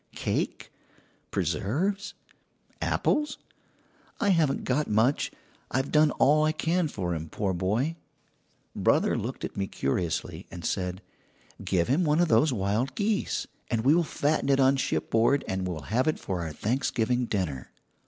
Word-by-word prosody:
Cake, - - -2 0.6
preserves, 190 - -1 0.7
apples? 300 0 +1 0.8
I 205 - +2
haven't 160 -7 +2
got 145 +4 0
much; 110 +6 +2 0.4
I - - -1
have 135 +1 -1
done 150 0 +5
all 150 +3 +4
I 155 0 +2
can 165 +2 +1
for 90 -10 -3
him, 80 -1 -5
poor 100 +1 -1
boy.' 105 - 0 0.8
"Brother - - +2
looked - - -4
at - - -7
me 95 -1 -1
curiously, 80 +3 -2
and 85 -2 -8
said: 90 0 -2 0.6
"'Give 90 -3 +1
him 145 +8 +2
one 150 0 +2
of 175 -1 +3
those 150 -1 +4
wild 110 +5 -1
geese, 205 0 0 0.2
and 115 -2 0
we 140 - +6
will 170 +1 +4
fatten 150 -2 0
it 135 0 +4
on 135 +1 +5
shipboard 135 0 +1
and 95 -1 -2
will 85 -4 -4
have 130 +5 +2
it 155 - +2
for 95 -3 -3
our 80 -2 -4
Thanksgiving 120 - 0
dinner.' 90 - -3
125 Hz, 155 wpm, -27 LUFS, 95-155 Hz, 0.8 s, we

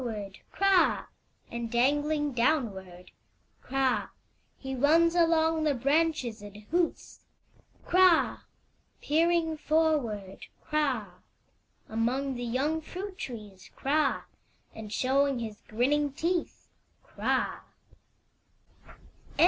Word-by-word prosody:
Peering 235 -3 -3 0.2
forward, - - -15
Kra! 390 -2 +3 0.5
And 235 -1 -4
dangling 290 +4 +1
downward, 195 - -1 0.5
Kra! 270 -1 0 0.5
He 265 0 -6
mns 320 +6 +4
along 325 -2 +3
the 295 -2 +2
branches 275 -4 0
and 205 0 -10
hoots, 345 0 -1 0.7
Kra! 365 -2 +4 0.6
Peering 325 +1 +1
forward, 290 -12 0 0.2
Kra! 250 -12 -1 0.7
Among 250 +5 -1
the 245 -1 -5
young 275 +7 -1
fmit 375 +4 -7
trees, 210 -6 -8
Kra! 285 +1 +1 0.5
And 215 -2 -9
showing 270 +3 +1
his 220 -3 -6
grinning 280 +6 +1
teeth, 340 +4 -2 0.4
Kra! - - -1
275 Hz, 90 wpm, -29 LUFS, 235-320 Hz, 0.7 s, mns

